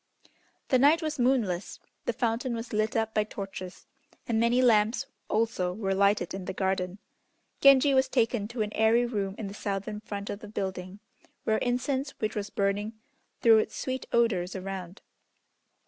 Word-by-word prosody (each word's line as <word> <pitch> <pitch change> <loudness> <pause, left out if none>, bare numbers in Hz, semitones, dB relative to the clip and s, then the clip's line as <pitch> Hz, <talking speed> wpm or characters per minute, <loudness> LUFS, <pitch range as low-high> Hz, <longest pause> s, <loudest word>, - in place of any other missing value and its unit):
The 255 - +4
night 300 +5 +5
was 305 -2 -3
moonless. 235 -8 0 0.3
The 240 - 0
fountain 235 +1 -1
was 230 +1 -6
lit 215 0 0
up 225 -1 0
by 215 - +2
torches, 195 -3 -8 0.4
and 225 -2 +1
many 235 +2 +3
lamps 230 0 +3 0.2
also 215 -5 0
were 195 -1 -1
lighted 200 -2 +2
in 190 -1 -5
the 190 - -4
garden. 190 -1 -1 0.6
Genji 275 0 +6
was 265 0 +4
taken 235 -5 +1
to 235 -1 -2
an 210 - -5
airy 225 +2 +3
room 200 -5 -2
in 220 - -5
the 195 - -6
southern 205 +1 -4
front 205 -2 -6
of 200 - -5
the 210 - -10
building, 190 -1 -5 0.4
where 220 0 +1
incense 260 +3 -1
which 215 - -2
was 205 -1 -3
burning 205 +2 -1 0.5
threw 225 -2 +7
its - - -2
sweet 260 0 -3
odors 200 -7 +1
around. 190 -1 -6
215 Hz, 165 wpm, -28 LUFS, 195-240 Hz, 0.6 s, threw